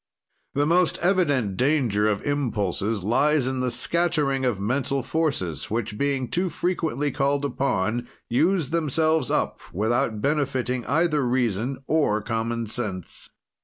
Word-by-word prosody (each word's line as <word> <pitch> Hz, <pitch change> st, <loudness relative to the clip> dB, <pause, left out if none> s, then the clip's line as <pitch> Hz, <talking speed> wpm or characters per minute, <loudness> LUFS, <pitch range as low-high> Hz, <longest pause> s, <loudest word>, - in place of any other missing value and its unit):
The 145 Hz, +1 st, +2 dB
most 175 Hz, +2 st, +3 dB
evident 145 Hz, -, +2 dB
danger 125 Hz, -6 st, +2 dB
of 100 Hz, -1 st, -2 dB
impulses 110 Hz, -, -1 dB
lies 145 Hz, +6 st, +2 dB
in 130 Hz, 0 st, -1 dB
the 130 Hz, 0 st, 0 dB
scattering 145 Hz, 0 st, +1 dB
of 120 Hz, -6 st, 0 dB
mental 130 Hz, +5 st, -1 dB
forces, 140 Hz, -, -1 dB
which, 110 Hz, -1 st, -2 dB
being 135 Hz, +1 st, 0 dB
too 180 Hz, +10 st, 0 dB
frequently 160 Hz, -4 st, -1 dB
called 140 Hz, +1 st, 0 dB
upon, 120 Hz, -4 st, -1 dB, 0.2 s
use 160 Hz, +4 st, +1 dB
themselves 160 Hz, -3 st, +1 dB
up -, -, 0 dB
without 110 Hz, +3 st, 0 dB
benefiting 130 Hz, -2 st, -1 dB
either 155 Hz, +1 st, +2 dB
reason 125 Hz, +1 st, -1 dB
or 145 Hz, -9 st, +2 dB
common 115 Hz, 0 st, -2 dB
sense. 105 Hz, -5 st, -5 dB
130 Hz, 130 wpm, -24 LUFS, 115-150 Hz, 0.2 s, most